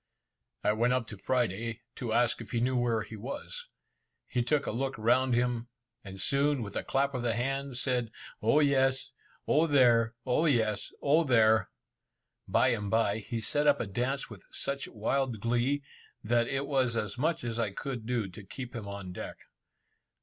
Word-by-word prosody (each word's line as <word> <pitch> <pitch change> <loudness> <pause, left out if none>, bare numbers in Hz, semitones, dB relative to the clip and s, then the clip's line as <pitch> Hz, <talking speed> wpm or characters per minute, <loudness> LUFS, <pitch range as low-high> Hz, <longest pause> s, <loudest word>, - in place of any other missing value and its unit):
I - - +4
went 120 +3 +2
up 130 -2 0
to 105 - -7
Friday, 115 -1 -1 0.2
to 120 -4 -3
ask 120 +1 +2
if - - -9
he 120 - +2
knew 130 +2 +1
where 120 -3 +1
he 110 - -9
was. 140 - -6 0.6
He 125 - 0
took 140 +4 +1
a - - -1
look 135 +3 -2
round 125 +3 +3
him, 120 -1 0 0.4
and 95 -1 -9
soon, 140 +3 +1
with 100 -2 -8
a - - -1
clap 140 +1 0
of 130 - -2
the 120 -2 0
hands, 135 +1 -2
said 125 -3 0 0.3
"O 115 +8 +4
yes! 135 -2 +2 0.4
O 160 +2 +4
there! 120 -5 +4
O 135 +6 +2
yes! 110 -7 +1
O 150 +4 +4
there!" 110 - +4 0.8
Bye 130 - +4
and 105 -4 -1
bye, 110 -1 +2
he 115 +2 -4
set 145 +6 +1
up 145 -1 +5
a - - -1
dance 125 +7 -2
with 105 -6 -11
such 140 0 -1
wild 120 +2 -1
glee, 120 +6 +1 0.4
that 115 +2 +2
it 135 +1 -1
was 130 -4 +1
as 105 +1 -3
much 160 +2 0
as 120 -1 -3
I 115 - +1
could 120 +2 -5
do 120 -4 0
to 95 +3 -11
keep 125 +5 -8
him 110 -3 -5
on 100 -2 -6
deck. - - -6
120 Hz, 185 wpm, -30 LUFS, 110-135 Hz, 0.8 s, up